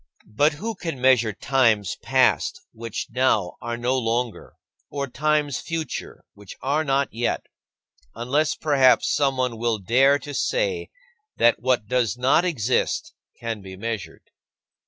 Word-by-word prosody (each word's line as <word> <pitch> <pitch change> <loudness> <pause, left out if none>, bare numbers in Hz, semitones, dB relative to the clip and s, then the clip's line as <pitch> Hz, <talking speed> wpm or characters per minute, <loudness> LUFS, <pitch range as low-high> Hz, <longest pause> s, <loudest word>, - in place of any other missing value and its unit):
But 145 +8 +3
who 220 +10 -4
can 165 -8 -5
measure 125 -4 +4
times 115 -4 +1
past - - +2
which 115 -1 -5
now 115 -7 +1
are 120 0 -4
no 125 +2 0
longer, 115 0 -3 0.3
or 140 -1 -3
times 150 +1 0
future 165 -4 -5
which 100 -1 -12
are 145 +4 +1
not 140 -2 0
yet 120 +1 -1 0.7
unless 135 +7 0
perhaps 135 -4 +3
someone 130 -4 0
will 115 -1 0
dare 130 +8 +3
to 145 0 -9
say 470 - -1 0.5
that 120 - +3
what 125 -3 +1
does 125 0 0
not 130 +7 +3
exist 180 - -1 0.3
can 115 -3 -4
be 95 -1 -10
measured? 110 -1 -6
130 Hz, 135 wpm, -23 LUFS, 115-145 Hz, 0.7 s, measure